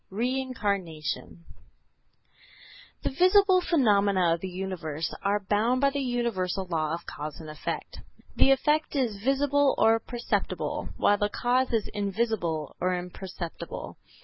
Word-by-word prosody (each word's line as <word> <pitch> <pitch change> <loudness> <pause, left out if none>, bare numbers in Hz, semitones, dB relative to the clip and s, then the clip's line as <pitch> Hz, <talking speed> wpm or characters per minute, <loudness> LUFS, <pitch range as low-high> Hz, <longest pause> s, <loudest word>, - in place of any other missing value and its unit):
REINCARNATION 200 -10 -2 1.6
The - - -1
visible 370 +4 +5
phenomena 200 - +3
of 165 - -2
the 190 - -5
universe 175 -4 -4
are 200 +1 +1
bound 225 +5 +2
by 275 +1 +3
the 285 - -2
universal 230 -7 -1
law 160 -3 -1
of 170 - -10
cause 150 +1 -6
and 160 - -9
effect. 155 0 -5 0.4
The - - +5
effect 300 +3 +2
is 230 -7 0
visible 280 +1 +3
or 225 0 +5
perceptible, 240 +1 -2
while 205 0 +3
the 205 - +1
cause 250 +3 +1
is 225 -3 +1
invisible 200 - -2
or 180 0 +1
imperceptible. 180 -1 -7
205 Hz, 125 wpm, -27 LUFS, 180-255 Hz, 1.6 s, visible